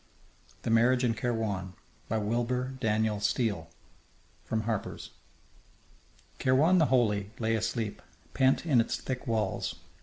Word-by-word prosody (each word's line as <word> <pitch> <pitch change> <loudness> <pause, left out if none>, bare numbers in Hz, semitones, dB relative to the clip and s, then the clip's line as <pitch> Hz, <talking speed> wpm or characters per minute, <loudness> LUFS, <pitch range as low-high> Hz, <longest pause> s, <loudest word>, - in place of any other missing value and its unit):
THE - - -1
MARRIAGE 120 +3 +4
IN 120 -2 +2
KAIRWAN 110 -5 -2 0.4
By 110 - +1
WILBUR 120 +4 -1
DANIEL 110 -2 +1
STEELE 105 -5 0 0.7
From 110 - -1
Harper's 110 -2 -4 1.3
Kairwan 150 +8 +4
the 155 - +4
Holy 105 -6 +2
lay 115 -1 0
asleep, 110 -1 -2 0.3
pent 135 +3 +3
in 135 -8 +4
its 115 - -2
thick 130 +1 -5
walls. 110 -4 -1
115 Hz, 120 wpm, -29 LUFS, 105-125 Hz, 1.3 s, MARRIAGE